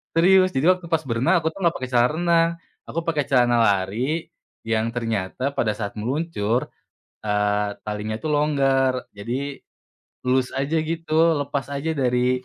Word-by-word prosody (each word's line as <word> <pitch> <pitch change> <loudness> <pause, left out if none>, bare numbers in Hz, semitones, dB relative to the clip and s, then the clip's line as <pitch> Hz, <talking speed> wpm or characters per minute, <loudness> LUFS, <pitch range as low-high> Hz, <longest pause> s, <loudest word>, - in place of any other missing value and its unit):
Serius, 185 0 +5
jadi 150 +7 +5
waktu 185 -2 -3
pas 160 -2 0
berenang 130 +8 +1
aku 160 - 0
tuh 195 - -12
gak 170 - 0
pakai 130 -1 -5
celana 120 0 +4
renang. 170 -1 +3 0.4
Aku 165 - -3
pakai 155 -4 -1
celana 120 -2 +3
lari, 115 - 0 0.3
yang 115 0 0
ternyata 115 +3 -2
pada 110 -6 0
saat 105 0 -5
meluncur, 125 -2 -1 0.5
eee, 105 0 +1
talinya 105 +1 -4
itu 120 +8 -4
longgar. 135 -4 +1
Jadi, 130 +7 -4 0.7
loose 130 0 +2
aja 140 +4 -1
gitu, 165 -1 +1
lepas 140 -1 -3
aja 155 +3 -2
dari 125 -1 +1
135 Hz, 150 wpm, -23 LUFS, 115-160 Hz, 0.7 s, Serius